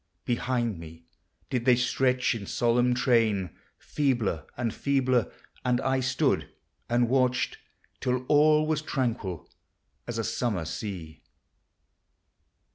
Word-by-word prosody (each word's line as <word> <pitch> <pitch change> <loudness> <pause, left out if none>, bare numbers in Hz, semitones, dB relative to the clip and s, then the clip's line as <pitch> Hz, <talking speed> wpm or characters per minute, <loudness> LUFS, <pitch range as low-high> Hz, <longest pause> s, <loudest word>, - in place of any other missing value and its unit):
Behind 120 -4 -1
me 80 0 -11 0.5
did 125 -2 -1
they 125 -2 +6
stretch 125 +1 +1
in 105 -4 -6
solemn 120 +1 +2
train, 115 -7 +2 0.3
Feebler 120 - -1
and 120 -3 -1
feebler; 130 -5 +1 0.3
and 125 -1 +2
I 135 0 +1
stood 130 0 +1 0.4
and 120 0 +3
watched 130 0 +1 0.4
Till 125 0 -1
all 150 +2 +4
was 155 -1 0
tranquil 115 - -2 0.6
as 120 -1 -4
a 115 - -1
summer 105 -8 -1
sea. 85 -2 -6
120 Hz, 115 wpm, -27 LUFS, 110-130 Hz, 0.6 s, they